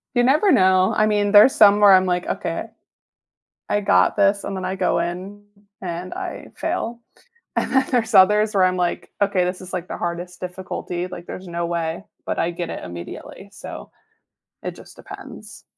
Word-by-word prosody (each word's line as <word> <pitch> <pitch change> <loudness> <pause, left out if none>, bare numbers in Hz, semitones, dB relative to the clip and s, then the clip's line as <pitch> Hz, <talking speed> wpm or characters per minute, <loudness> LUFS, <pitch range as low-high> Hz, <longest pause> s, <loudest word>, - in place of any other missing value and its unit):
You 245 - +4
never 305 +10 +4
know, 185 - +4
I 215 - +3
mean, 205 -1 +1
there's 210 +5 +7
some 205 -1 +6
where 205 -1 +7
I'm, 185 0 +5
like, 180 -1 -1
"Okay. 165 +6 -3 1.0
I 205 - +1
got 90 - +3
this," 200 0 +2
and 200 - -4
then 185 - -5
I 185 +1 -3
go 185 -2 +1
in, 185 +4 -5 0.4
and 175 0 -5
I - - -6
fail, 235 +1 -3 0.6
and - - -1
then 265 0 +3
there's 235 -3 0
others 210 +3 +5
where 190 - +4
I'm 185 0 +2
like, 175 -1 -2
"Okay, 195 -3 +2
this 180 +1 -4
is," 185 0 -11
like, 180 -1 -4
"the - - -6
hardest 175 +1 -5
difficulty," 180 -1 -5
like, 175 -1 -9
"there's 185 +1 -8
no 170 0 -3
way," 170 +1 -3 0.2
but - - -3
I 170 - 0
get 170 -1 -5
it - - -6
immediately, 85 -1 -9
so - - -10 0.7
it - - -4
just - - -15
depends. - - -11
185 Hz, 185 wpm, -21 LUFS, 175-205 Hz, 1.0 s, there's